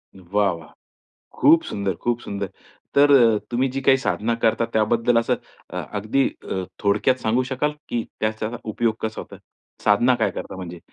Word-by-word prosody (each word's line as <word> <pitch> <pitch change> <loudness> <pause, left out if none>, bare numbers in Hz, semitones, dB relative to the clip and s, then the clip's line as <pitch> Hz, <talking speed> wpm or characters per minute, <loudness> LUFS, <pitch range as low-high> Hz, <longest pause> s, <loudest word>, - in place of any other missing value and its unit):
वाह! 95 +2 0
वाह! 80 -2 -11 0.7
खूप 165 0 +6
सुंदर, 100 -2 -2
खूप 120 0 -1
सुंदर. 100 -2 -4 0.5
तर 145 +1 +6
अ, 115 -5 +6
तुम्ही 125 +3 +1
जी 135 +1 -3
काही 135 0 +5
साधना 115 +3 0
करता 115 +1 +3
त्याबद्दल 115 +2 +2
असं 115 - +1 0.3
अ, - - -7 0.2
अगदी 110 +6 +1 0.2
अ, 95 -1 -2 0.2
थोडक्यात 105 +6 +3
सांगू 115 +3 +1
शकाल, 150 +3 0 0.2
की 115 -2 -1 0.2
त्याचा 110 0 -1
उपयोग 110 +1 0
कसा 110 0 -3
होतो. - - -10 0.5
साधना 120 +5 +4
काय 115 -2 +1
करता - - -7
म्हणजे? 90 -2 -7
110 Hz, 165 wpm, -23 LUFS, 105-120 Hz, 0.7 s, खूप